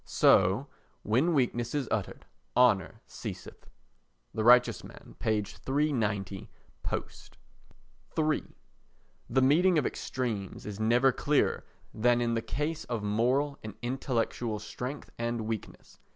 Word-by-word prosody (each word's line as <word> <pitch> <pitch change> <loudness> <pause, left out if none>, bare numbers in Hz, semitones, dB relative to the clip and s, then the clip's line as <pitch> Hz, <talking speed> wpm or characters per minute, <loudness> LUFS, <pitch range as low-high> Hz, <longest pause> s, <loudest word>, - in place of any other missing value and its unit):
So 95 +8 +4 0.4
"when 130 +11 +2
weakness 120 -2 0
is 140 -4 -1
utter, 105 -5 -2 0.4
honour 115 -8 +3
ceaseth." - - -9 0.6
[The 110 - -1
Righteous 120 -4 +5
Man, - - -13
p. 110 -1 +1
390, 110 -8 -2 0.3
post.] - - -5 0.8
iii 155 -1 +1 0.8
The 130 +2 +3
meeting 170 +6 +4
of 145 - +2
extremes 110 -7 -3
is 105 -1 -6
never 120 +4 +4
clearer 145 +3 +1 0.3
than 120 +2 +3
in 120 -1 0
the 115 - 0
case 150 +6 -3
of 115 -3 -3
moral 125 +7 +1
and 110 -2 -7
intellectual 120 -3 -1
strength 105 +7 -6
and 115 0 -1
weakness. 110 -1 -6
120 Hz, 120 wpm, -30 LUFS, 110-135 Hz, 0.8 s, Righteous